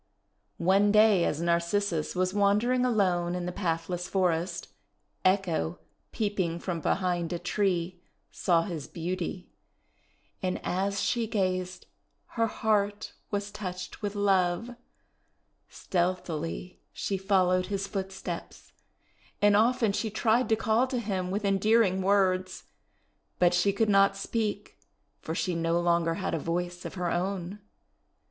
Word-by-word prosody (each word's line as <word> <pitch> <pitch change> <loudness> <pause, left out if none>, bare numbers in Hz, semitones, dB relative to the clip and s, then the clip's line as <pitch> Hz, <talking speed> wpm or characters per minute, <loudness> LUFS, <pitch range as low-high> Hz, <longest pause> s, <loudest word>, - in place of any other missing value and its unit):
One 195 +4 +3
day 210 -4 +5
as 150 - -1
Narcissus 170 0 0
was 185 +1 0
wandering 210 +5 +2
alone 180 -7 +1
in 180 -1 -3
the 180 - -2
pathless 175 -1 -2
forest, 180 -2 0 0.5
Echo, 185 -3 +1 0.3
peeping 200 -6 -1
from 170 -1 -4
behind 175 -1 0
a 175 - -1
tree, 180 -1 -1 0.3
saw 170 -2 +2
his 165 -7 -5
beauty; 180 +1 -4 0.9
and 185 -1 -1
as 200 +2 -1
she 235 -2 0
gazed 185 -3 -2 0.4
her 230 -1 0
heart 205 -1 0 0.2
was 205 0 -3
touched 185 -3 -6
with 205 -1 -3
love. 195 +2 +1 1.0
Stealthily 175 -1 -3
she 200 - -3
followed 185 -1 +2
his 200 0 -2
footsteps, 190 -1 -6 0.7
and 205 0 +5
often 230 0 +3
she 220 +2 -2
tried 220 +2 +1
to 220 - +4
call 225 +3 +2
to 255 -1 -2
him 195 -5 -2
with 205 +2 -2
endearing 195 0 +3
words; 185 -1 +1 0.7
but 180 -1 +4
she 175 +3 +3
could 220 +3 +1
not 195 -1 +4
speak, 210 0 -3 0.4
for 160 - -5
she 180 - -1
no 165 0 +1
longer 170 -1 +2
had - - -3
a 165 - 0
voice 175 +3 -3
of - - -6
her 180 -2 -1
own. 185 +2 -2
185 Hz, 130 wpm, -28 LUFS, 175-205 Hz, 1.0 s, day